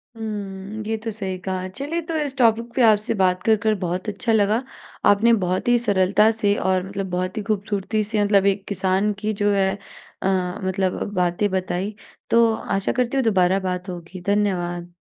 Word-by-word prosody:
हुँ। 210 -1 -6
ये 225 - 0
तो 225 - -3
सही 190 -3 -4
कहा 185 -1 -2
चलिए 285 - -4
तो 330 - -1
इस 285 -3 -2
टॉपिक 230 -1 +2
पे 260 - +2
आपसे 215 0 +2
बात 185 0 +2
कर 220 +1 +4
कर 220 -1 +3
बहुत 180 +1 -3
अच्छा 210 +3 -2
लगा। 215 +3 +2 0.4
आपने 225 +3 +5
बहुत 180 +4 -1
ही 245 0 +5
सरलता 205 -1 +3
से 205 -2 +1
और 185 -2 +1
मतलब 195 -1 -4
बहुत 185 +2 -2
ही 215 - -2
खूबसूरती 210 0 -1
से 210 0 0
मतलब 200 -1 +3
एक 195 0 -13
किसान 195 +1 +1
की 215 +1 -1
जो 205 - +3
है 195 -1 +2 0.5
अ, - - +1 0.4
मतलब 190 0 -1
बातें 180 +2 +1
बताई। 190 +2 -2 0.3
तो 230 0 +4
आशा 195 -2 -1
करती 250 +2 0
हूँ 265 - +2
दोबारा 190 -3 +3
बात 180 +1 -4
होगी। 175 +1 -8
धन्यवाद। 175 -4 -1
200 Hz, 185 wpm, -22 LUFS, 185-220 Hz, 0.5 s, आपने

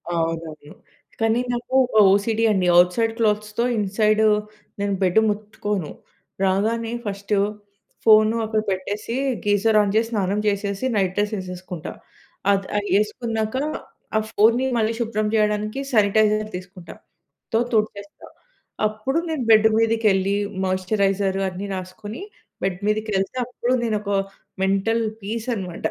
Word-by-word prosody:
అవునవును. 165 -2 -4 0.5
కానీ, 225 +1 +2
నాకు 240 +1 -5
ఒక 245 - -12 0.2
ఓసీడీ 220 +3 +1
అండి. 185 -3 +1
ఔట్‌సైడ్ 225 +6 +2
క్లోత్స్‌తో, 215 0 0
ఇన్‌సైడు 215 +2 +2 0.5
నేను 200 0 0
బెడ్ 185 +3 +4
ముట్టుకోను. 205 -4 -3 0.5
రాగానే 220 +4 0
ఫస్టు 200 0 -2 0.7
ఫోను 215 0 +6
అక్కడ 220 0 0
పెట్టేసి, 205 +5 -3 0.3
గీజర్ 205 +2 +3
ఆన్ 200 -1 0
చేసి, 225 +1 +3
స్నానం 200 -1 0
చేసేసి 200 +2 -1
నైట్ 190 -3 +1
డ్రెస్ 210 +1 0
ఏసేసుకుంటా. 180 -2 -7 0.6
అద్ 195 -1 +1
అది 205 - -2
ఏసుకున్నాక 220 +1 -2 0.6
ఆ - - +4
ఫోన్‍ని 230 +4 +3
మళ్ళీ 220 0 +1
శుభ్రం 215 -2 -1
చేయడానికి 215 +2 0
శానిటైజర్ 215 -1 +3
తీసుకుంటా. 180 -1 -11 0.6
తో 225 - +4
తుడిచేస్తా. 210 -2 -2 0.6
అప్పుడు 260 +8 -3
నేను 300 -6 -2
బెడ్డు 220 0 +6
మీదికెళ్ళి 215 -3 +2 0.3
మాయిశ్చరైజర్ 195 +1 0
అన్నీ 190 +3 -6
రాసుకొని, 190 +4 -7 0.4
బెడ్ 185 -1 -1
మీదకెళ్తే 210 +1 -1
అప్పుడు 250 +1 -2
నేను 220 -2 0
ఒక 205 - -3 0.5
మెంటల్ 195 +4 +1 0.2
పీసనమాట. 215 -4 -4
210 Hz, 120 wpm, -22 LUFS, 195-220 Hz, 0.7 s, ఫోను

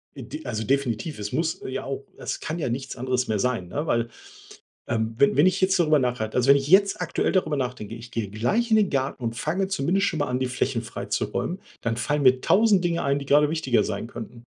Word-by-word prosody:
Äh, 135 - -7
d 150 +5 -8
also 110 -3 -3
definitiv, 135 +3 -1
es 105 0 -4
muss 160 +4 -1
ja 130 - -4
auch 135 0 -5
es - - -4
kann 160 +3 -4
ja 140 - -1
nichts 130 +3 -4
anderes 130 0 -1
mehr 110 -2 0
sein, 115 -8 -1
ne, 150 - -3
weil, 115 0 +1 0.8
ähm, 110 0 -1
we 140 -1 +4
wenn 150 +5 +6
ich 185 +1 +2
jetzt 190 0 +3
darüber 155 -3 +4
nachhalte 125 -4 -1
also 125 +2 +2
wenn 140 - +8
ich 140 +1 -2
jetzt 195 +2 +4
aktuell - - 0
darüber 160 -6 +1
nachdenke, 125 -5 -4
ich 115 0 -10
gehe 115 -4 -3
gleich 210 - 0
in 220 - +6
den 210 -3 +3
Garten 135 -1 -2
und 115 -1 -2
fange 190 - -1
zumindest 190 +3 +1
schonmal 145 -5 -1
an, 125 - -1
die 130 - +1
Flächen 125 - -1
freizuräumen, 185 +2 -3 0.2
dann 115 0 -1
fallen 145 +4 0
mir 130 -1 +5
1.000 205 -3 +4
Dinge 170 -1 0
ein, 140 0 +1
die 140 - -7
grade 145 +1 +4
wichtiger 130 -9 +1
sein 105 +1 -3
könnten. 120 0 -9
135 Hz, 230 wpm, -25 LUFS, 120-160 Hz, 0.8 s, wenn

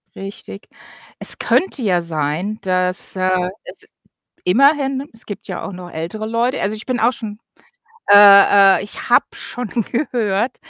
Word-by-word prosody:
Richtig. 195 0 -10 0.5
Es - - +3
könnte 365 -7 0
ja 180 -5 +1
sein, 165 +6 -3
dass, 185 0 +1
äh, 185 -1 0 0.2
es - - -11 0.6
immerhin 275 +5 +2
es 225 - -8
gibt 205 - -8
ja - - -6
auch 200 - -7
noch 180 -1 -10
ältere 170 +8 -6
Leute 235 +3 -1
also, 205 +2 -2
ich 215 - -9
bin 255 -2 -2
auch 235 +2 +2
schon 215 -4 -8 0.7
äh 200 -1 +7
äh, - - -5
ich 205 - -8
habe - - +4
schon 245 0 -6 0.2
gehört, 235 -4 -2
205 Hz, 150 wpm, -18 LUFS, 185-235 Hz, 0.7 s, äh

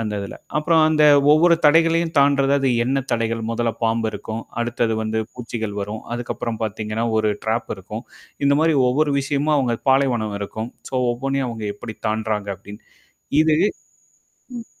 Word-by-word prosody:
அந்த 110 -2 -3
இதுல. 100 - -7 0.2
அப்புறம் 160 +1 +3
அந்த 155 -1 +2 0.3
ஒவ்வொரு 170 +2 +5
தடைகளையும் 165 +2 +3
தாண்டுறது 140 0 +4
அது 135 -1 +1 0.2
எண்ண 135 +2 +1
தடைகள், 115 0 -1
முதல்ல 115 0 -1
பாம்பு 115 0 +1
இருக்கும். 110 +2 -6 0.2
அடுத்தது 120 -1 -1
வந்து 110 0 -1
பூச்சிகள் 115 -4 -5
வரும். 105 +2 -5
அதுக்கப்புறம் 120 -1 -4
பார்த்தீங்கன்னா 110 +1 -3
ஒரு 110 -1 +2
ட்ராப் 115 +1 -1
இருக்கும். 105 +5 -8 0.4
இந்த 140 0 +4
மாரி 160 -1 +3
ஒவ்வொரு 145 +3 +1
விஷயமா 145 +2 0
அவங்க 120 -3 0
பாலைவனம் 120 -6 +1
இருக்கும். 110 +3 -5 0.2
சோ - - -6 0.2
ஒவ்வொண்ணையும் 135 +1 -2
அவங்க 110 -2 -6
எப்படி 110 0 -8
தாண்டுறாங்க 110 -2 -2
அப்படின்னு. 105 +1 -12 0.6
இது 160 -1 +3 1.0
ம். 230 - -8
115 Hz, 150 wpm, -21 LUFS, 110-140 Hz, 1.0 s, ஒவ்வொரு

